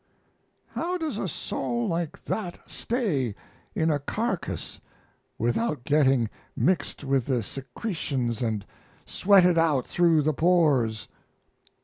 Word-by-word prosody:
How 360 Hz, +2 st, -2 dB
does 310 Hz, -, -3 dB
a -, -, -1 dB
soul 120 Hz, -6 st, -2 dB
like 170 Hz, -2 st, -3 dB
that 180 Hz, -5 st, -3 dB
stay 160 Hz, -, -1 dB, 0.4 s
in 160 Hz, 0 st, +2 dB
a 145 Hz, -, +1 dB
carcass 210 Hz, +6 st, -3 dB, 0.6 s
without 120 Hz, -, 0 dB
getting 135 Hz, -5 st, +3 dB, 0.3 s
mixed 170 Hz, -5 st, 0 dB
with 135 Hz, -3 st, +1 dB
the 125 Hz, -4 st, +1 dB
secretions 130 Hz, -, -3 dB
and 110 Hz, -4 st, -1 dB, 0.4 s
sweated 180 Hz, -3 st, +5 dB
out 150 Hz, -6 st, +2 dB
through 165 Hz, -3 st, +3 dB
the 155 Hz, +1 st, +2 dB
pores? 145 Hz, -, +2 dB
150 Hz, 110 wpm, -26 LUFS, 125-180 Hz, 0.6 s, sweated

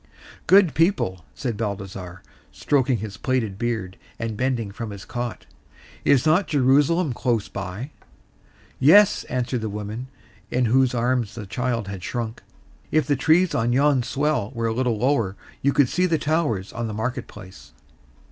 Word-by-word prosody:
"Good 190 Hz, -4 st, +6 dB
people," 150 Hz, -, +1 dB
said 120 Hz, -6 st, -3 dB
Balthasar, 95 Hz, -4 st, -5 dB, 0.3 s
stroking 130 Hz, -3 st, +1 dB
his 100 Hz, -1 st, -7 dB
plaited 110 Hz, -7 st, -1 dB
beard, 110 Hz, -6 st, -2 dB, 0.2 s
and 115 Hz, -1 st, -3 dB
bending 120 Hz, -3 st, -1 dB
from 115 Hz, +1 st, -6 dB
his 100 Hz, -1 st, -9 dB
cot, 120 Hz, -1 st, -5 dB, 0.6 s
"is 140 Hz, 0 st, +4 dB
not 165 Hz, +5 st, +3 dB
Jerusalem 145 Hz, +2 st, +3 dB
close 120 Hz, -4 st, 0 dB
by?" 100 Hz, +9 st, -6 dB, 0.9 s
"Yes," 195 Hz, +10 st, +6 dB
answered 125 Hz, -1 st, -2 dB
the 110 Hz, -, -3 dB
woman 105 Hz, +4 st, -5 dB, 0.4 s
into 125 Hz, -3 st, +1 dB
whose 130 Hz, -1 st, +3 dB
arms 120 Hz, -3 st, 0 dB
the 110 Hz, -3 st, -6 dB
child 115 Hz, +1 st, -2 dB
had 100 Hz, -2 st, -6 dB
shrunk. 115 Hz, +1 st, -4 dB, 0.5 s
"If 155 Hz, -3 st, +2 dB
the 145 Hz, -, +1 dB
trees 160 Hz, +7 st, +3 dB
on 120 Hz, +1 st, +1 dB
yon 140 Hz, 0 st, +3 dB
swell 140 Hz, -2 st, -1 dB
were 115 Hz, 0 st, -2 dB
a 115 Hz, -, 0 dB
little 120 Hz, -2 st, 0 dB
lower 115 Hz, -5 st, +1 dB, 0.3 s
you 140 Hz, -, +3 dB
could 140 Hz, -2 st, +4 dB
see 180 Hz, +8 st, +1 dB
the 165 Hz, -2 st, +2 dB
towers 150 Hz, -, -1 dB
on 120 Hz, -1 st, -3 dB
the 110 Hz, -, -5 dB
market 125 Hz, +3 st, -3 dB
place." 95 Hz, -9 st, -13 dB
120 Hz, 155 wpm, -23 LUFS, 105-140 Hz, 0.9 s, Good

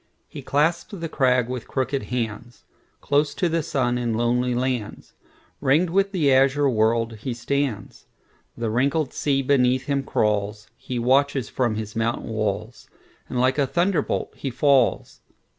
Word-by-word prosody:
He -, -, -9 dB
clasps 160 Hz, +8 st, 0 dB
the 165 Hz, -, -3 dB
crag 125 Hz, -5 st, +2 dB
with 125 Hz, -1 st, -5 dB
hooked 130 Hz, -1 st, -2 dB
hands; 120 Hz, -4 st, -4 dB, 0.4 s
Close 145 Hz, +1 st, +1 dB
to 180 Hz, -, +1 dB
the 165 Hz, 0 st, 0 dB
sun 125 Hz, -4 st, -1 dB
in 120 Hz, -2 st, -1 dB
lonely 120 Hz, +2 st, +1 dB
lands, 125 Hz, -4 st, -3 dB, 0.5 s
Ring'd 160 Hz, +6 st, +2 dB
with 195 Hz, +2 st, +2 dB
the 150 Hz, -8 st, +2 dB
azure 135 Hz, +2 st, +3 dB
world, 115 Hz, -1 st, +1 dB
he 120 Hz, +3 st, -5 dB
stands. 140 Hz, -1 st, -3 dB, 0.5 s
The 115 Hz, -2 st, -2 dB
wrinkled 135 Hz, +4 st, 0 dB
sea 135 Hz, -2 st, 0 dB
beneath 130 Hz, -1 st, +2 dB
him 140 Hz, 0 st, 0 dB
crawls; 105 Hz, -4 st, -1 dB
He 125 Hz, 0 st, -6 dB
watches 135 Hz, +1 st, +2 dB
from 120 Hz, -4 st, 0 dB
his 110 Hz, 0 st, -6 dB
mountain 115 Hz, +1 st, -1 dB
walls, 110 Hz, +1 st, -3 dB, 0.4 s
And 125 Hz, -, -2 dB
like 130 Hz, +3 st, +2 dB
a 140 Hz, -, +2 dB
thunderbolt 175 Hz, 0 st, 0 dB
he 135 Hz, -, -4 dB
falls. 135 Hz, 0 st, +2 dB
130 Hz, 150 wpm, -23 LUFS, 115-140 Hz, 0.5 s, azure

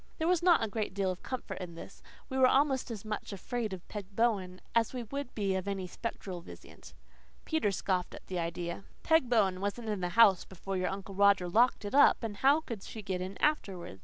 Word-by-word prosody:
There 320 Hz, -, 0 dB
was 360 Hz, -1 st, +3 dB
not 345 Hz, -7 st, +5 dB
a -, -, 0 dB
great 210 Hz, -2 st, -3 dB
deal 195 Hz, -2 st, +1 dB
of 180 Hz, -, -7 dB
comfort 255 Hz, -1 st, -5 dB
in 175 Hz, -3 st, -7 dB
this. -, -, -11 dB, 0.3 s
We 265 Hz, -1 st, -2 dB
were 260 Hz, -, +7 dB
almost 270 Hz, -1 st, +2 dB
as 220 Hz, -3 st, -6 dB
much 215 Hz, 0 st, -4 dB
afraid 220 Hz, +3 st, -3 dB
of 185 Hz, -2 st, -8 dB
Peg 200 Hz, -2 st, -8 dB
Bowen 195 Hz, -6 st, +1 dB
as 230 Hz, +1 st, +2 dB
we 245 Hz, -, -3 dB
would 275 Hz, +3 st, -6 dB
be 200 Hz, -3 st, 0 dB
of 190 Hz, +1 st, -2 dB
any 195 Hz, -2 st, -2 dB
spectral 185 Hz, -2 st, -6 dB
visitant. 85 Hz, -, -13 dB, 0.5 s
Peter 315 Hz, -10 st, +1 dB
scoffed 185 Hz, -1 st, -1 dB
at -, -, -12 dB
the 185 Hz, -2 st, -3 dB
idea. 170 Hz, +2 st, -4 dB, 0.2 s
"Peg 320 Hz, -6 st, +3 dB
Bowen 195 Hz, -6 st, +2 dB
wasn't 215 Hz, +3 st, -3 dB
in 205 Hz, -3 st, -2 dB
the 180 Hz, -, -1 dB
house 200 Hz, -6 st, +7 dB
before 195 Hz, +1 st, -6 dB
your 185 Hz, -1 st, 0 dB
Uncle 195 Hz, 0 st, -6 dB
Roger 200 Hz, -2 st, +4 dB
locked 225 Hz, +4 st, +3 dB
it 205 Hz, -, -5 dB
up, 285 Hz, -3 st, +6 dB
and 210 Hz, -3 st, -4 dB
how 280 Hz, +6 st, +4 dB
could 230 Hz, -9 st, -6 dB
she 220 Hz, +1 st, -8 dB
get 190 Hz, -2 st, -3 dB
in 190 Hz, +1 st, -5 dB
afterwards?" 190 Hz, -, -1 dB
200 Hz, 220 wpm, -31 LUFS, 185-240 Hz, 0.5 s, were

